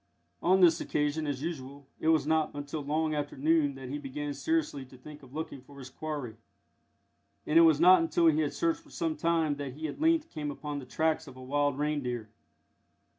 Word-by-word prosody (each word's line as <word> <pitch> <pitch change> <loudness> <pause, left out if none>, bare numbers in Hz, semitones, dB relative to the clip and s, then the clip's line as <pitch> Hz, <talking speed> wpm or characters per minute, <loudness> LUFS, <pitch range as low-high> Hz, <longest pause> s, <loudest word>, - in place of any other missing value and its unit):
On 190 +2 +4
this 170 -2 +5
occasion, 150 +1 -1
as 140 -1 -3
usual, 140 -4 -6
it - - -2
was 160 -3 +4
not 160 0 +2
until 145 +1 -5
long 155 +2 0
after 145 -2 -3
noon 150 0 +2
that 135 -1 -8
he 145 +2 -4
began 145 +1 -5
seriously 300 - -1
to 130 0 -15
think 150 +4 -12
of 135 0 -15
looking 155 -4 -5
for 140 +2 -16
his 130 -2 -10
quarry, 145 -8 -5 1.1
and 160 +2 +5
it - - +8
was 160 -3 +6
not 180 +1 +7
until 165 +1 +1
he 155 -1 +5
had 150 -2 +1
searched 330 -1 0
for 315 - -20
some 165 - -2
time 160 -2 +1
that 140 -3 -5
he 155 +3 -4
at 150 - -8
length 325 0 +2
came 150 -1 -4
upon 145 0 -5
the 130 - -10
tracks 160 +2 0
of 130 - -11
a 130 - -10
wild 145 +1 0
reindeer. 130 -7 -2
150 Hz, 210 wpm, -30 LUFS, 140-160 Hz, 1.1 s, it